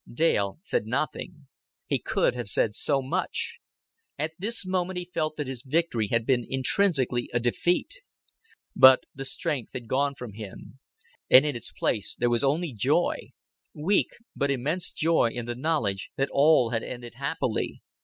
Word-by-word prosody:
Dale 120 -7 +1
said 110 - -1
nothing. 150 +5 -3 0.4
He - - 0
could - - +1
have 120 -4 -5
said 105 +1 +1
so 135 +4 0
much. 130 - -2 0.6
At 155 +2 -2
this 215 +1 -3
moment 185 0 -1
he 180 - -3
felt 155 -3 -2
that 150 - -3
his 130 -2 -5
victory 135 -5 0
had 115 +2 0
been 125 -2 +2
intrinsically 135 -3 +1
a - - +4
defeat. 175 - 0 0.7
But 130 0 +8
the 135 0 -6
strength 150 -4 -3
had 120 -3 -6
gone 140 +3 +1
from 125 -5 -8
him; 110 +4 -10 0.5
and 130 +3 +8
in 150 - -1
its 120 - -8
place 105 -3 -1
there 120 0 +1
was 120 +2 +1
only 150 +2 +1
joy 105 - +1 0.5
weak 180 +7 +2 0.3
but 140 - 0
immense 145 +7 -1
joy 160 -7 +2
in 120 0 -5
the 120 - -3
knowledge 120 -8 -1
that 135 - 0
all 140 -5 +4
had 115 -1 0
ended 120 0 -7
happily. 135 -3 -2
135 Hz, 165 wpm, -27 LUFS, 120-160 Hz, 0.7 s, But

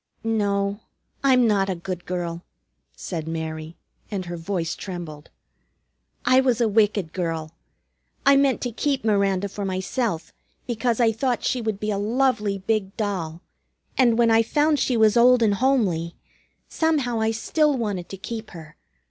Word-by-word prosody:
"No, 200 -2 0 0.4
I'm 255 -3 +5
not 200 -3 +2
a 190 - -1
good 180 0 -6
girl," 175 -1 -3 0.5
said 160 -4 -5
Mary, 160 0 -5 0.3
and 195 -3 -3
her 175 0 -5
voice 165 0 -3
trembled. 170 -6 -7 1.0
"I 255 +2 +5
was 250 -3 +1
a 235 - +3
wicked 205 -5 +1
girl. 165 -3 -3 0.7
I 275 0 +7
meant 275 -1 +3
to 245 - -2
keep 275 +2 -1
Miranda 200 -2 +2
for 200 +1 -6
myself, 190 -1 -2 0.3
because 240 0 -1
I 230 -2 +4
thought 245 +2 -1
she 250 - 0
would 220 -3 -2
be 215 0 -2
a 200 - -1
lovely 220 -2 +1
big 195 0 -2
doll. 180 -6 -3 0.5
And 240 -3 +4
when 235 -1 +4
I 225 0 +6
found 295 +5 +2
she 250 - +1
was 220 0 +4
old 245 0 +6
and 210 -2 +3
homely, 200 -9 +1 0.5
somehow 285 -8 0
I 220 0 +1
still 290 +6 +1
wanted 205 -7 -3
to 195 - -7
keep 220 +3 -6
her. 155 -2 -12
210 Hz, 155 wpm, -24 LUFS, 180-240 Hz, 1.0 s, I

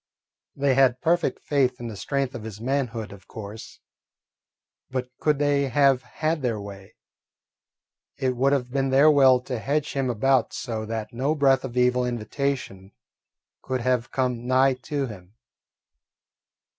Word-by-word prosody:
They 140 -1 +2
had 130 -1 +3
perfect 170 +3 0
faith 130 -4 +1
in 120 - -5
the 110 - -6
strength 135 +6 -2
of 120 -4 -7
his 110 -2 -8
manhood, 120 -4 -2
of 100 -1 -14
course; 110 0 -9 1.1
but 125 -1 -4
could 150 -2 +2
they 145 -1 +2
have 135 0 +3
had 155 +2 -2
their 120 -4 -1
way, 100 -1 -10 1.2
it 130 -1 0
would 135 +3 +2
have 125 -3 0
been 135 0 0
their 140 +4 +6
will 135 -3 +6
to 125 -2 -4
hedge 145 +5 -1
him 135 -2 -1
about 125 +2 +2
so 110 -3 -4
that 110 -1 -4
no 135 +6 0
breath 135 -3 +3
of 125 -2 -6
evil 125 0 +3
invitation 120 -4 -3 0.7
could 130 -1 -3
have 125 -1 0
come 125 -2 -2
nigh 130 +1 +4
to 135 +2 -3
him. 100 -4 -11
130 Hz, 150 wpm, -25 LUFS, 115-140 Hz, 1.2 s, their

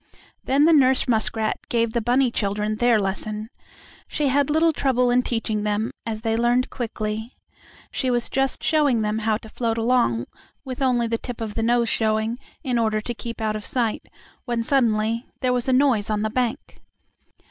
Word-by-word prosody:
Then 280 +3 +3
the 330 - +5
nurse 265 -3 +4
muskrat 220 -1 0
gave 230 -1 +1
the 235 - 0
bunny 245 +2 +2
children 210 0 -1
their 240 -1 +4
lesson. 210 +3 -2 0.6
She 295 -2 0
had 280 +1 +2
little 320 +2 +3
trouble 250 -4 +1
in 250 +1 +4
teaching 225 -3 -1
them, 210 +2 -1 0.2
as 215 -1 -3
they 225 -1 0
learned 240 +2 +1
quickly. 220 -1 -4 0.6
She 260 - -1
was 240 -1 +1
just 270 0 -1
showing 285 -8 +2
them 210 +1 -1
how 220 -1 +1
to 220 - -13
float 230 0 -2
along 225 - +1 0.4
with 260 0 -6
only 250 -3 +2
the 230 0 -1
tip 245 -3 -7
of 220 -2 -4
the 225 - -2
nose 235 +1 +2
showing, 220 +2 0 0.2
in 250 -4 0
order 215 -1 +1
to 240 +3 -4
keep 230 0 -7
out 215 -1 0
of 215 - -5
sight, 235 -2 -1 0.4
when 240 -2 -1
suddenly 230 -2 +1
there 255 -1 +2
was 245 0 -1
a - - +3
noise 255 -6 +3
on 210 -1 0
the 215 - -1
bank. 245 -1 -2
230 Hz, 185 wpm, -23 LUFS, 220-255 Hz, 0.6 s, the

